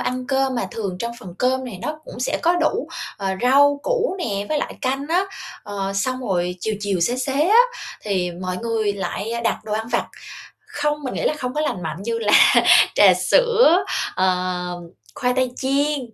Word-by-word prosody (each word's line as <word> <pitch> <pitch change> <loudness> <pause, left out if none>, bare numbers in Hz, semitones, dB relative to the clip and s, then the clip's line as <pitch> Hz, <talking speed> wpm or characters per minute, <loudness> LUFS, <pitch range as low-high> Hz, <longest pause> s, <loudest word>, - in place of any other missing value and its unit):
ăn 255 0 -3
cơm 270 -1 +1
mà 240 - -2
thường 200 -5 -4
trong 235 +4 -3
phần 175 - -10
cơm 260 +1 +1
này 225 -7 -7
nó 305 0 -3
cũng - - -10
sẽ 250 - -1
có 345 +1 +3
đủ, 370 +7 0 0.3
ờ, 195 -1 -3
rau 285 +3 +4
củ - - 0
nè, 205 - -3
với 305 - 0
lại - - -4
canh 270 +1 -2
á. 360 +4 +2 0.4
Ờ, 195 -1 -4
xong 255 +6 -1
rồi 180 -1 0
chiều 220 +3 -1
chiều, 200 -3 -1
xế 240 +9 +1
xế 275 +5 0
á 435 +3 +6 0.4
thì 185 -4 -1
mọi 180 +1 -5
người 220 -1 -1
lại, 200 +2 -4
a, 235 - -2
đặt 235 - 0
đồ 215 - -5
ăn 220 +1 -2
vặt. - - 0 0.6
Không, 295 0 -2
mình 255 - -4
nghĩ - - -3
là - - +1
không 250 -2 -4
có 300 - -1
lành 195 -12 -2
mạnh, 165 +3 -5
như 230 +2 -2
là 210 -2 0 0.6
trà - - +7
sữa, 460 -7 +4 0.3
ờ, 180 -1 -1 0.3
khoai 250 0 0
tây 255 -1 +1
chiên, 280 +2 0
245 Hz, 200 wpm, -21 LUFS, 195-285 Hz, 0.6 s, trà